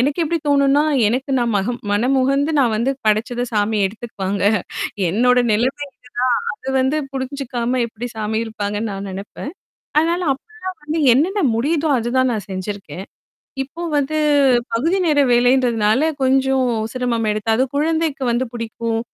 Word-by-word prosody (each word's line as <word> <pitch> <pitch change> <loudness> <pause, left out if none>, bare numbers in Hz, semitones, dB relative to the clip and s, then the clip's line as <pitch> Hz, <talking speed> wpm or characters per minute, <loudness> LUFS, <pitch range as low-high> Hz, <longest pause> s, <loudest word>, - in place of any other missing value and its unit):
எனக்கு 280 +6 +1
எப்பிடி 330 +1 0
தோணுன்னா, 280 +1 +4 0.3
எனக்கு 260 +5 -2
நான் 240 -1 0
மகம் 230 +5 -1
மனமுகந்து 270 +7 +2
நான் 240 -4 +2
வந்து 235 +5 +1 0.2
படைச்சத 225 +3 +1
சாமி 215 0 +1
எடுத்துக்குவாங்க 200 -2 -4 0.7
என்னோட 250 +6 +3
நிலைமை 260 +7 0 0.6
இதுதான் 475 -1 -3
அது 265 - -5
வந்து 265 +4 +1 0.2
புரிஞ்சுக்காம 255 -2 -2
எப்பிடி 230 +1 -7
சாமி 220 0 -1
இருப்பாங்கன்னு 210 0 -3
நான் 195 0 -5
நினைப்பேன். 200 +9 -7 0.5
அதனால 335 +3 +2
அப்பலாம் 375 +3 -9
வந்து 310 +2 -2
என்னென்ன 365 - +1
முடியுதோ, 300 +6 0
அதுதான் 250 +2 +1
நான் 205 -3 -4
செஞ்சிருக்கேன். 190 -2 -6 0.6
இப்ப 330 +6 -8
வந்து 290 +2 0 0.6
பகுதி 325 +12 +1
நேர 300 -3 +3
வேலைன்றதுனால 240 -1 +3 0.2
கொஞ்சம் 265 -1 +2 0.3
சிரமமெடுத்தாவுது, 225 -1 0
குழந்தைக்கு 315 -2 0
வந்து 240 +2 0
புடிக்கும், 230 0 -3
250 Hz, 130 wpm, -19 LUFS, 220-280 Hz, 0.7 s, தோணுன்னா